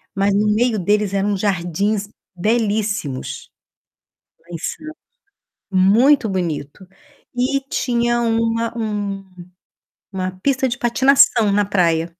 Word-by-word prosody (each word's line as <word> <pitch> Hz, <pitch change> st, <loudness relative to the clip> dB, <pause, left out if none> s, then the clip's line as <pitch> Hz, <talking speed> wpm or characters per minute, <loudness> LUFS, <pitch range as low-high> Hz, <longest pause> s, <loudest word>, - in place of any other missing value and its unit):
Mas 195 Hz, +1 st, +1 dB
no 210 Hz, +1 st, +2 dB
meio 230 Hz, -1 st, +1 dB
deles 205 Hz, +2 st, 0 dB
eram 200 Hz, 0 st, 0 dB
jardins 200 Hz, +2 st, -1 dB, 0.3 s
belíssimos, 205 Hz, -, -2 dB, 0.9 s
lá 170 Hz, -, -31 dB
em 170 Hz, -, -4 dB
Santos. 310 Hz, -, -7 dB, 0.7 s
Muito 220 Hz, +7 st, +4 dB
bonito. 175 Hz, -1 st, -4 dB, 0.5 s
E 260 Hz, +3 st, 0 dB
tinha 240 Hz, -1 st, 0 dB
uma 230 Hz, 0 st, 0 dB
um 205 Hz, -3 st, -3 dB, 0.9 s
uma 185 Hz, -1 st, -3 dB
pista 265 Hz, -1 st, +1 dB
de 240 Hz, -, -3 dB
patinação 240 Hz, -3 st, +4 dB
na 205 Hz, 0 st, +2 dB
praia. 170 Hz, -4 st, +1 dB
210 Hz, 110 wpm, -19 LUFS, 190-235 Hz, 0.9 s, Muito